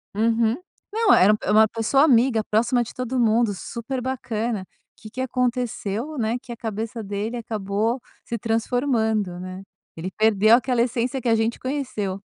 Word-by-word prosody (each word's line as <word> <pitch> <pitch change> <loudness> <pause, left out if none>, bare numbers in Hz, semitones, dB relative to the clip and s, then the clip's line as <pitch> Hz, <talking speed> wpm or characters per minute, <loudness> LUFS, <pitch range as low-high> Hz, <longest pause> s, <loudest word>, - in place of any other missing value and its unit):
Uhum, 225 +1 +2 0.4
não, 445 -1 +4
era 205 +3 +6
é 210 - 0
uma 220 +1 +6
pessoa 230 +6 +2
amiga, 240 -5 +4
próxima 240 +3 +1
de - - -10
todo 255 0 -2
mundo, 225 -2 +3
super 245 +6 -5
bacana. 230 -5 -3 0.3
Que 215 - -10
que 260 - -4
aconteceu, 250 0 -2
né, 230 +1 0
que 245 - -11
a 235 - -6
cabeça 225 +1 -4
dele 205 +4 -3
acabou 220 +2 -2 0.3
se 235 - -3
transformando, 225 -4 0
né, 185 +1 -7 0.3
ele 170 +3 -5
perdeu 215 +1 +5
aquela 250 -1 +1
essência 245 +2 -1
que 235 - 0
a 225 - +4
gente 225 +1 0
conheceu. 255 -8 -3
230 Hz, 160 wpm, -23 LUFS, 215-250 Hz, 0.4 s, era